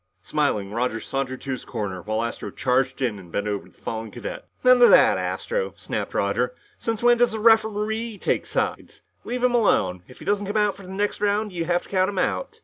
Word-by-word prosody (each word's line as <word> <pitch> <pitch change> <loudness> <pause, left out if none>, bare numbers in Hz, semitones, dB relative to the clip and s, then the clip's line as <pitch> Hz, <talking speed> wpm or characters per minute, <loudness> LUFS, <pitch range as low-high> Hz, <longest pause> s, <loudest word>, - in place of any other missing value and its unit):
Smiling, 105 -10 0
Roger 115 0 -1
sauntered 130 +1 -3
to 135 - -5
his 130 - -4
corner 105 -6 -4
while 110 +4 -1
Astro 115 - -4
charged 130 +1 0
in 110 -5 -1
and 90 -3 -14
bent 100 +4 -2
over 100 -1 -3
the - - -28
fallen 110 0 -5
cadet. 110 +1 -7 0.2
"None 255 -1 +6
of 240 - +9
that, - - +6
Astro!" 480 -1 -2
snapped - - -4
Roger. - - 0 0.2
"Since 225 0 -2
when 240 0 +5
does 240 -2 +3
a - - -3
referee 220 0 +2
take - - -1
sides? - - -3 0.2
Leave 245 +1 -3
him 250 -1 +3
alone! 95 - +2
If 125 - -15
he - - -12
doesn't 205 0 0
come 205 +2 -1
out 210 -1 +2
for 200 - -13
the 185 - -11
next 205 +1 -1
round, 205 0 +1
you 170 -2 -2
have 175 +1 +1
to - - -16
count 185 0 +2
him 200 - -6
out!" - - -1
185 Hz, 225 wpm, -24 LUFS, -, 0.2 s, of